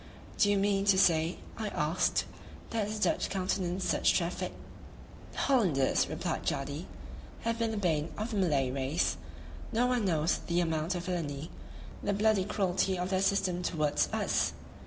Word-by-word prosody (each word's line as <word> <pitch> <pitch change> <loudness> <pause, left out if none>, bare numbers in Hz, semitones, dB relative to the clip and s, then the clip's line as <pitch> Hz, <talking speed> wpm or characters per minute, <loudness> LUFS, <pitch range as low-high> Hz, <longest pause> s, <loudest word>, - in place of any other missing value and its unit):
"Do 205 - +5
you 205 - +3
mean 195 0 +1
to 195 -2 +5
say," 165 -2 +3 0.2
I 220 - -2
asked, 160 -2 +1 0.5
"that 215 -3 -1
the 215 0 -4
Dutch - - +1
countenance 185 -1 -1
such - - +3
traffic?" - - -2 0.8
"The - - -12
Hollanders," 185 - +2
replied - - -3
Jadee, 140 +5 -3 0.5
"have 230 0 -1
been 230 -1 +1
the 220 - -3
bane 165 -5 0
of 215 +3 -3
the 215 - -2
Malay 145 -9 +2
race; 135 - 0 0.5
no 235 +3 +2
one 250 -3 +1
knows 160 -3 +1
the 170 0 +1
amount 165 +1 0
of 175 0 -4
villainy, 160 -4 -3 0.5
the 200 - 0
bloody 205 -1 +2
cruelty 190 -2 0
of 180 +2 -2
their 190 0 +2
system 195 -2 +1
towards 155 -4 0
us. - - +1
185 Hz, 160 wpm, -31 LUFS, 160-205 Hz, 0.8 s, Do